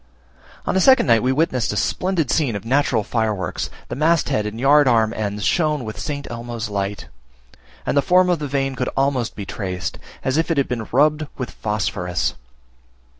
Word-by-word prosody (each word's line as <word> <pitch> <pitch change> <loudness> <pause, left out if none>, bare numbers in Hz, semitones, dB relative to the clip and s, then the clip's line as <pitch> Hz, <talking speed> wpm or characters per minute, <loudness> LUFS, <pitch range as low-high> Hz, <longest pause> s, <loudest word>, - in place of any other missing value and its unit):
On - - -1
a - - +4
second 265 +6 +6
night 115 -2 +4
we 130 - +1
witnessed 130 -4 +1
a 105 - -3
splendid 180 - 0
scene 135 -9 +1
of 100 - -6
natural 130 -3 +2
fireworks; 105 -6 -2 0.2
the - - -5
mast 160 +4 +2
head 105 -1 0
and 110 +2 -6
yard 145 +2 +5
arm 115 -2 +3
ends 105 -1 -3
shone 150 - +1
with 110 - -6
St. 145 -2 -4
Elmo's 120 -1 -5
light; 100 0 -3 0.8
and - - 0
the 140 - +5
form 180 +4 +4
of 175 -3 +1
the 150 - -3
vane 135 0 -1
could 125 -1 -2
almost 135 -4 0
be 100 - -6
traced, 90 -5 -4 0.2
as 130 +2 0
if 165 - +1
it 165 - +1
had 140 - +2
been 115 -3 -3
rubbed 150 +3 +3
with 125 - -4
phosphorus. 95 -5 -2
125 Hz, 190 wpm, -21 LUFS, 110-145 Hz, 0.8 s, second